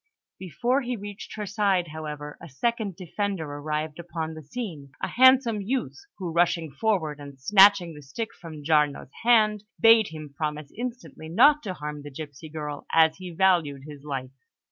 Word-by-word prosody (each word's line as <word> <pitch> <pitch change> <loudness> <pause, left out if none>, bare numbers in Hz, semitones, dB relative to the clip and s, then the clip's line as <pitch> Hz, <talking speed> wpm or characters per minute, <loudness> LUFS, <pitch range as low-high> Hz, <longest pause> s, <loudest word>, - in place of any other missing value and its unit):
Before 240 - 0
he 250 -1 -3
reached 205 -1 -8
her 210 -1 -4
side, 195 -4 +1
however, 150 -1 -6
a 165 - -10
second 220 - -2
defender 190 0 -3
arrived 150 +2 -4
upon 165 -2 -4
the 155 - -9
scene: 155 - -6
a - - -2
handsome 255 -4 +5
youth, 245 +6 -2 0.2
who, 180 -4 -4
rushing 170 -2 +1
forward 160 -6 -1
and 140 -2 -11
snatching 195 +2 +6
the 150 - -11
stick 220 +12 -5
from 160 -4 -10
Giarno's 150 -3 +1
hand, 215 -3 +4 0.2
bade 225 -2 +7
him 155 -2 -9
promise 150 -2 -4
instantly 230 - -6
not 285 - +5
to 190 -7 -5
harm 150 -1 -6
the 145 - -8
gipsy 145 +2 -9
girl, 150 -2 -6
as 160 -1 +4
he 185 -1 -8
valued 170 -6 +2
his 145 -2 -10
life. 135 -3 -5
165 Hz, 165 wpm, -26 LUFS, 150-205 Hz, 0.2 s, bade